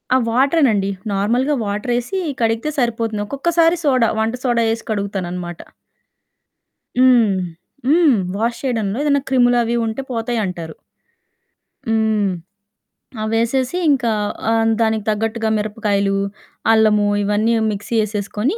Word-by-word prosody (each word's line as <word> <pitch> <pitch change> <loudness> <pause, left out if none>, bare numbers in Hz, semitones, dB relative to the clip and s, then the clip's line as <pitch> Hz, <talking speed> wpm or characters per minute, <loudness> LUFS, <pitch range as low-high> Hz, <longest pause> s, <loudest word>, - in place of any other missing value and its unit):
ఆ - - +6
వాటరేనండి. 250 -5 +2 0.2
నార్మల్‌గా 240 +9 +1
వాటరేసి 240 - -2 0.2
కడిగితే 225 +6 0
సరిపోతుంది. 225 -3 -1
ఒక్కొక్కసారి 330 +7 +2
సోడా 255 -6 +3
వంట 220 +2 0
సోడా 240 -3 +2
ఏసి 230 - -6
కడుగుతానన్నమాట. 180 -4 -4 1.4
హ్మ్. 245 -5 +5 0.6
హ్మ్. 310 -2 +5 0.2
వాష్ 230 +3 -1
చేయడంలో 225 -5 -1
ఏదైనా 285 -1 +2
క్రిములవి 245 -2 +3
ఉంటే 225 +4 -3
పోతాయంటారు. 215 -9 -3 1.1
హ్మ్. 220 -3 +1 0.9
అవేసేసి 235 +7 0
ఇంకా 250 -5 +1 0.4
ఆహ్, 225 0 +2
దానికి 220 -1 +1
తగ్గట్టుగా 220 +1 -1
మిరపకాయలు, 205 -2 0 0.6
అల్లము 215 -2 +4 0.2
ఇవన్నీ 210 +3 +1 0.2
మిక్సీ 205 +3 -4
ఏసేసుకొని 210 - -2
225 Hz, 100 wpm, -19 LUFS, 210-250 Hz, 1.4 s, ఆ